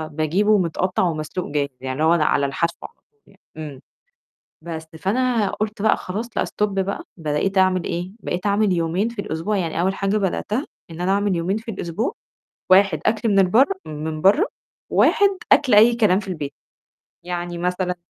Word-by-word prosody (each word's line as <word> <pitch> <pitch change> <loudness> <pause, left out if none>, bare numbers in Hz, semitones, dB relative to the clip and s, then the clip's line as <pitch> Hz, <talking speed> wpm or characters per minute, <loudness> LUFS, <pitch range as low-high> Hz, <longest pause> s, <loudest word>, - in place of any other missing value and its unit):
باجيبه 195 +7 +2
متقطّع 185 +1 0
ومسلوق 165 +1 -2
جاهز، 145 -1 0
يعني 130 0 -3
اللي - - +3
هو 165 +2 +5
لأ 155 - +2
على 140 -1 +2
الحشو 165 +5 -1
على - - -9 0.2
طول 435 - -43
يعني، - - -23 0.2
إمم، 145 -4 -7 0.8
بس 160 -1 -7
فأنا 230 +1 +1
قُلت 215 -1 -4
بقى: 220 - +3
"خلاص 220 +5 -6
لأ - - +2
stop 210 - -1
بقى،" 195 0 -2
بقيت 160 +5 -1
أعمل 185 -1 +3
إيه 175 +2 -4
بقيت 180 -1 -4
أعمل 205 -1 +2
يومين 175 +6 0
في 235 - -10
الأسبوع 195 +3 -2
يعني 170 -2 -1
أول 190 +2 +1
حاجة 195 +1 0
بدأتها 210 - -1 0.3
إن 165 +2 -7
أنا 185 +2 +1
أعمل 200 -2 +1
يومين 180 +5 -1
في 225 +1 -6
الأسبوع، 195 - -3 0.6
1 190 -4 +5
أكل 220 +1 +1
من 200 -2 +3
البرّه 225 - +4
من 155 +1 -5
بَرّه، 210 - +4 0.4
1 405 - +4 0.2
أكل 260 -6 +5
أي 225 +3 +7
كلام 210 -4 +3
في 195 - -11
البيت 150 -6 -5 0.7
يعني 175 -1 -4
مثلًا 180 +1 -1
185 Hz, 180 wpm, -22 LUFS, 165-210 Hz, 0.8 s, أي